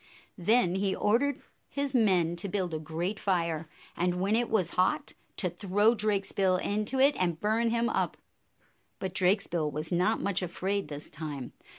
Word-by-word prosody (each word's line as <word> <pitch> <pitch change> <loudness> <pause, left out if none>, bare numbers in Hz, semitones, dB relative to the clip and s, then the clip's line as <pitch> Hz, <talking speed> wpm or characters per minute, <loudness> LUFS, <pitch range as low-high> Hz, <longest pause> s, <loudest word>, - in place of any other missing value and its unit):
Then 185 0 +3
he 190 0 0
ordered 250 +6 +1 0.3
his 280 -1 -2
men 185 -8 +3
to 195 +3 -2
build 180 -3 -2
a 155 - -2
great 165 +6 -3
fire, 165 -4 -1 0.3
and, 180 0 0
when 200 +4 +2
it 240 +1 +1
was 190 -7 +2
hot, 185 - +1 0.2
to 185 - +1
throw 200 +5 +2
Drakesbill 195 -3 +1
into 215 +7 -1
it 280 +2 +5
and 170 -3 0
burn 220 +3 +1
him 235 +1 +1
up. - - -1 0.8
But 190 -2 -4
Drakesbill 180 -4 +1
was 155 +3 -5
not 180 +6 +2
much 200 -1 0
afraid 190 +1 -2
this 145 0 -7
time. 150 -5 -6
190 Hz, 165 wpm, -29 LUFS, 170-215 Hz, 0.8 s, it